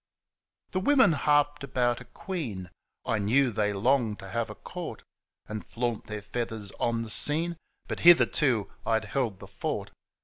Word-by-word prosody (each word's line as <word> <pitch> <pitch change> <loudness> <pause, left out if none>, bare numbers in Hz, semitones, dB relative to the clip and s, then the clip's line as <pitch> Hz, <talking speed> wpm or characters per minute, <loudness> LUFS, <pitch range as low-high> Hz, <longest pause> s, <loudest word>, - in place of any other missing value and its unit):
The 185 - 0
women 265 0 +5
harped 145 -1 +2
about 125 -2 0
a - - -11
queen, 125 - -6 0.3
I 110 - 0
knew 120 +6 +3
they 105 -1 0
longed 110 +1 +1
to 95 - -10
have 115 +3 -2
a 105 - -8
court - - -8 0.4
And 110 0 -6
flaunt 120 -2 -3
their 105 - -4
f 105 0 -12
eathars 110 -4 -3
on 115 -1 0
the 115 - -8
scene, 165 +8 +4 0.3
But - - -4
hitherto 150 - +5
I'd 110 -1 0
held 115 -3 -1
the - - -11
fort. - - -4
120 Hz, 165 wpm, -28 LUFS, 105-145 Hz, 0.4 s, women